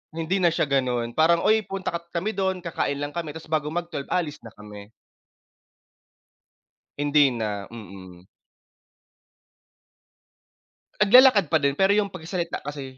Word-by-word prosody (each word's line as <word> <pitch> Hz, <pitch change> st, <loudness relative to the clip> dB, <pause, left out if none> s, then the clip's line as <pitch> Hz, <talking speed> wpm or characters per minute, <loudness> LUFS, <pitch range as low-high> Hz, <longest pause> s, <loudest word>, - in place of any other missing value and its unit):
Hindi 165 Hz, +4 st, -1 dB
na 180 Hz, -, +3 dB
siya 165 Hz, -, +1 dB
ganun 125 Hz, -4 st, -1 dB
parang, 165 Hz, +5 st, +3 dB
uy 215 Hz, +1 st, +2 dB
punta 195 Hz, -1 st, -4 dB
kat 170 Hz, 0 st, -6 dB
kami 185 Hz, +6 st, -1 dB
dun 190 Hz, -3 st, -2 dB
kakain 160 Hz, -4 st, -2 dB
lang 145 Hz, +1 st, -5 dB
kami 160 Hz, -2 st, -6 dB
tapos 160 Hz, 0 st, -11 dB
bago 155 Hz, -2 st, 0 dB
mag 170 Hz, +2 st, -4 dB
12:00 140 Hz, -, -5 dB
aalis 155 Hz, -5 st, -2 dB
na 115 Hz, -, -14 dB
kami. 105 Hz, -1 st, -12 dB, 2.1 s
Hindi 145 Hz, 0 st, +3 dB
na, 105 Hz, -5 st, -4 dB
mm. 95 Hz, -5 st, -12 dB, 2.7 s
Naglalakad 215 Hz, -2 st, +6 dB
pa 160 Hz, -, +4 dB
din 140 Hz, 0 st, 0 dB
pero 195 Hz, +1 st, +3 dB
'yung 205 Hz, -1 st, +1 dB
pagsasalita 170 Hz, 0 st, -5 dB
kasi 140 Hz, -3 st, -7 dB
155 Hz, 140 wpm, -24 LUFS, 130-180 Hz, 2.7 s, Naglalakad